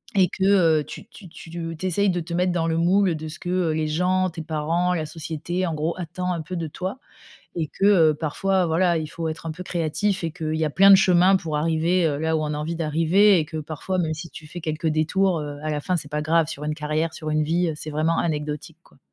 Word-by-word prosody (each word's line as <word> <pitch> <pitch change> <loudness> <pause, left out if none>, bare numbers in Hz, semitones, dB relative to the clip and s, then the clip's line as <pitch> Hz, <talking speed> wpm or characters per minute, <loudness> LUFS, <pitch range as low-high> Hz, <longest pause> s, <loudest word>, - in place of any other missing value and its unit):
et 190 -2 +5
que, 190 - -4
heu, 170 -6 +4
tu - - -10
tu 220 -5 -14
tu 165 - -12
te 165 -1 -5
tu 165 +3 -7
essayes 195 +3 +2
de 180 -1 0
te 170 0 -6
mettre 180 +1 +1
dans 165 -2 0
le 165 0 0
moule 180 +1 +3
de 155 0 -6
ce 155 - -10
que, 175 - -6
heu, 180 -3 +1
les 155 0 -1
gens, 185 +4 +1
tes 165 -1 -7
parents, 165 +3 0
la 160 -3 -2
société, 160 +3 -4
en 165 - -2
gros, 155 +2 -2
attend 180 +1 -3
un 170 - -3
peu 180 +4 -6
de 165 -1 -3
toi 185 - -5 0.6
et 165 -3 -1
que, 195 - +3
heu, 170 -7 +5
parfois, 185 +5 0
voilà, 170 +1 +2
il 155 -1 -3
faut 165 +1 -5
être 160 +1 -6
un 165 - -2
peu 180 +4 -9
créatif 175 +3 -1
et 165 - -1
qu'il 155 -1 -3
y 160 0 0
a - - 0
plein 195 +7 +5
de 195 - +11
chemins 185 0 +5
pour 160 -5 -2
arriver, 165 +3 +1
heu, 145 -2 -1
là 160 0 +1
où - - -1
on 150 0 -2
a - - -3
envie 155 +3 -3
d'arriver 165 +6 +4
et 155 - -1
que 160 +1 -6
parfois, 155 +5 -4
même 160 -2 0
si 165 +2 -7
tu 155 - -11
fais 175 +3 -8
quelques 155 0 -2
détours, 165 +4 +1
heu, 145 -1 -6
à 155 - -2
la 150 -1 -2
fin, 180 +3 0
c'est 145 -3 -7
pas 150 - -1
grave 160 +1 +2
sur 150 -2 -6
une 150 0 -2
carrière, 155 +1 -2
sur 155 - -6
une 155 0 +1
vie, 170 +3 +1
heu, 160 - -2
c'est 155 - -7
vraiment 155 +2 0
anecdotique, 150 0 -3
quoi. - - -24
165 Hz, 270 wpm, -23 LUFS, 155-180 Hz, 0.6 s, de